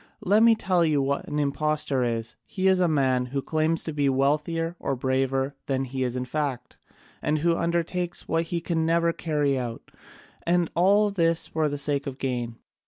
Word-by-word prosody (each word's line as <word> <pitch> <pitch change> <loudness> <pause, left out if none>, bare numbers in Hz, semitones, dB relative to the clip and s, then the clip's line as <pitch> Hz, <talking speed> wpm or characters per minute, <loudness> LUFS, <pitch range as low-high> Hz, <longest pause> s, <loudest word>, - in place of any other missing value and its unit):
Let 205 +4 +3
me 230 0 +6
tell 185 -4 +1
you 155 -3 +2
what 140 +1 -1
an 150 - -3
impostor 150 -1 0
is. 115 -2 -2
He 190 -1 -1
is 190 -1 +4
a 180 - +3
man 130 -5 +1
who 135 +2 -2
claims 160 +1 0
to 160 - -3
be 145 -2 +1
wealthier 150 +5 0
or 135 - -1
braver 135 +1 0
than 135 -1 0
he 130 0 -4
is 125 -1 -1
in 125 0 -2
fact, 135 -3 -3 0.5
and 155 - +1
who 165 +2 +2
undertakes 170 +1 -2
what 165 +1 0
he 170 0 -3
can 165 -1 -1
never 170 +1 +2
carry 150 -5 0
out, 120 -2 -6 0.5
and 175 -1 +1
all 200 +4 +4
this 165 -3 +1
for 155 -1 -1
the 145 - -3
sake 140 0 -1
of 135 -1 -5
gain. 120 -4 -3
150 Hz, 190 wpm, -26 LUFS, 135-170 Hz, 0.5 s, me